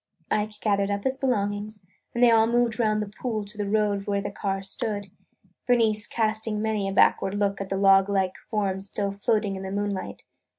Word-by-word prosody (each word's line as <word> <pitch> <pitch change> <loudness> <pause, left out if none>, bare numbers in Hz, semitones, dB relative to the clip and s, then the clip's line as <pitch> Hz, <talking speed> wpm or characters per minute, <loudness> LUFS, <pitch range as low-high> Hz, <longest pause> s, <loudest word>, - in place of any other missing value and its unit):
Ike 210 0 -1
gathered 200 -2 +1
up 200 0 -2
his 265 0 0
belongings 205 -5 -2 0.3
and 240 - +2
they 240 - +7
all 225 -1 +5
moved 235 -1 +1
round 215 -2 +2
the - - -7
pool 220 -5 -2
to 205 +2 -10
the 205 -1 -3
road 205 -2 0
where 200 -1 +1
the 200 0 -4
car 195 -1 -3
stood, 205 -1 -4 0.6
Bernice 220 -4 +3
casting 220 -1 -1
many 215 -2 -1
a - - -3
backward 195 0 +3
look 200 -1 0
at 195 - -5
the 195 - -1
log 195 0 +5
like 190 -2 0
form 195 -4 -1
still 200 0 -3
floating 200 0 0
in 190 - -6
the 190 - -5
moonlight. 200 -1 -3
205 Hz, 200 wpm, -26 LUFS, 200-220 Hz, 0.6 s, they